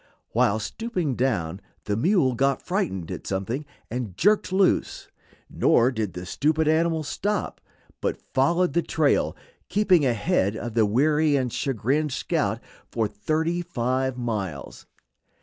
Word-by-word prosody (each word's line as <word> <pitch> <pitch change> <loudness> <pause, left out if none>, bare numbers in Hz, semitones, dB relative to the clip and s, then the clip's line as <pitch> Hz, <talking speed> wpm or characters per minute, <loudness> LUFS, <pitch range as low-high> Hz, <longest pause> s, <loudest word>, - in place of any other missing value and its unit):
While 105 - +3
stooping 180 - -3
down 100 -9 -1 0.2
the 105 - -1
mule 155 - +2
got 135 +2 +1
frightened 170 - -2
at - - -6
something 115 +10 -3 0.2
and 115 -7 -4
jerked 205 - +3
loose; 190 0 +1 0.4
nor 120 +2 +3
did 110 -7 -3
the 90 +1 -6
stupid 155 - +1
animal 160 0 +2
stop, 205 +7 -2 0.4
but - - -1
followed 170 +5 +2
the 170 - +3
trail, 155 -3 +1 0.3
keeping 190 -6 +3
ahead 105 -4 +1
of 120 0 -5
the 110 -2 +3
weary 150 +6 +3
and 130 -4 0
chagrined 135 +4 0
scout 130 - -1 0.3
for 115 -2 0
thirty 160 +11 -1
five 130 -5 -1
miles. 100 - -4
135 Hz, 130 wpm, -25 LUFS, 110-160 Hz, 0.4 s, While